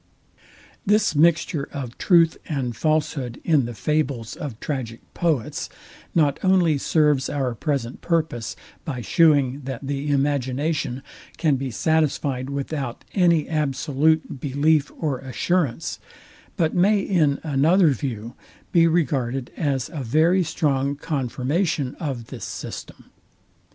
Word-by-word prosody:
This 210 Hz, -1 st, +3 dB
mixture 165 Hz, -1 st, +2 dB
of 130 Hz, -4 st, -6 dB
truth 170 Hz, -3 st, +4 dB
and 130 Hz, -6 st, -2 dB
falshood 150 Hz, -4 st, -1 dB
in 150 Hz, -6 st, +3 dB
the 120 Hz, -1 st, -6 dB
fables 130 Hz, -1 st, -1 dB
of 130 Hz, -7 st, -6 dB
tragic 125 Hz, -6 st, -4 dB
poets 155 Hz, -10 st, -1 dB, 0.5 s
not 145 Hz, -4 st, +3 dB
only 180 Hz, -6 st, +3 dB
serves 150 Hz, -3 st, +2 dB
our 135 Hz, -4 st, -1 dB
present 130 Hz, -1 st, -3 dB
purpose, 160 Hz, -9 st, -1 dB, 0.3 s
by 135 Hz, -7 st, -4 dB
shewing, 140 Hz, -, +3 dB
that 135 Hz, 0 st, -5 dB
the 140 Hz, +1 st, -3 dB
imagination 140 Hz, 0 st, 0 dB, 0.3 s
can 155 Hz, -4 st, +2 dB
be 135 Hz, 0 st, -3 dB
satisfyed 140 Hz, 0 st, 0 dB
without 140 Hz, -2 st, -4 dB
any 170 Hz, -5 st, +3 dB
absolute 155 Hz, 0 st, 0 dB
belief 145 Hz, +2 st, +1 dB
or 145 Hz, -6 st, -1 dB
assurance; 150 Hz, +2 st, -1 dB, 0.6 s
but 165 Hz, -4 st, +1 dB
may 200 Hz, +3 st, +4 dB
in 160 Hz, -8 st, +1 dB
another 160 Hz, +5 st, +4 dB
view 120 Hz, -5 st, -3 dB, 0.4 s
be 165 Hz, -1 st, +5 dB
regarded 135 Hz, -6 st, 0 dB
as 135 Hz, -5 st, -1 dB
a 155 Hz, -5 st, -5 dB
very 160 Hz, +10 st, +3 dB
strong 140 Hz, -3 st, 0 dB
confirmation 140 Hz, -, -1 dB
of 135 Hz, -8 st, -4 dB
this -, -, -7 dB
system. -, -, -8 dB
145 Hz, 120 wpm, -23 LUFS, 130-160 Hz, 0.6 s, be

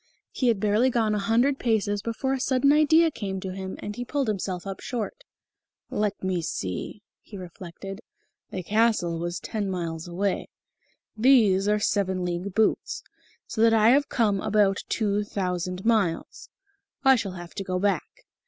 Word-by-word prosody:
He 255 Hz, -, 0 dB
had 225 Hz, -4 st, +3 dB
barely 215 Hz, +5 st, +3 dB
gone 225 Hz, -3 st, +1 dB
a 210 Hz, -, 0 dB
hundred 240 Hz, +7 st, +2 dB
paces 205 Hz, -3 st, 0 dB
before 235 Hz, +5 st, -2 dB
a 270 Hz, -, -1 dB
sudden 260 Hz, +2 st, +3 dB
idea 315 Hz, +2 st, +5 dB
came 195 Hz, -7 st, -4 dB
to 185 Hz, 0 st, -5 dB
him, 190 Hz, 0 st, -5 dB
and 205 Hz, -, -5 dB
he 245 Hz, -, -4 dB
pulled 275 Hz, +1 st, -1 dB
himself 185 Hz, -3 st, -3 dB
up 195 Hz, -1 st, -5 dB
short. 245 Hz, -, -5 dB, 0.7 s
"Let 210 Hz, -2 st, -1 dB
me 185 Hz, -2 st, 0 dB
see," 100 Hz, -, -4 dB, 0.2 s
he 205 Hz, -, -11 dB
reflected; 185 Hz, +2 st, -9 dB, 0.5 s
"the 185 Hz, -, -5 dB
castle 210 Hz, -5 st, +1 dB
was 175 Hz, +1 st, -3 dB
ten 210 Hz, -3 st, -3 dB
miles 170 Hz, -2 st, -4 dB
away. 190 Hz, +3 st, -2 dB, 0.7 s
These 215 Hz, -5 st, +4 dB
are 210 Hz, 0 st, +3 dB
seven 190 Hz, -3 st, 0 dB
league 180 Hz, +2 st, -3 dB
boots 455 Hz, -, +1 dB, 0.4 s
so 220 Hz, -, -3 dB
that 225 Hz, 0 st, +6 dB
I 220 Hz, 0 st, +5 dB
have 285 Hz, +4 st, +4 dB
come 210 Hz, -5 st, +1 dB
about 205 Hz, -2 st, +2 dB
two 210 Hz, -2 st, 0 dB
thousand 180 Hz, -2 st, -3 dB
miles. 205 Hz, -8 st, 0 dB, 0.6 s
I 265 Hz, 0 st, +8 dB
shall 205 Hz, -6 st, -3 dB
have 175 Hz, -1 st, -9 dB
to 195 Hz, -, -4 dB
go 185 Hz, -1 st, -2 dB
back." 195 Hz, -3 st, -2 dB
205 Hz, 165 wpm, -26 LUFS, 185-230 Hz, 0.7 s, I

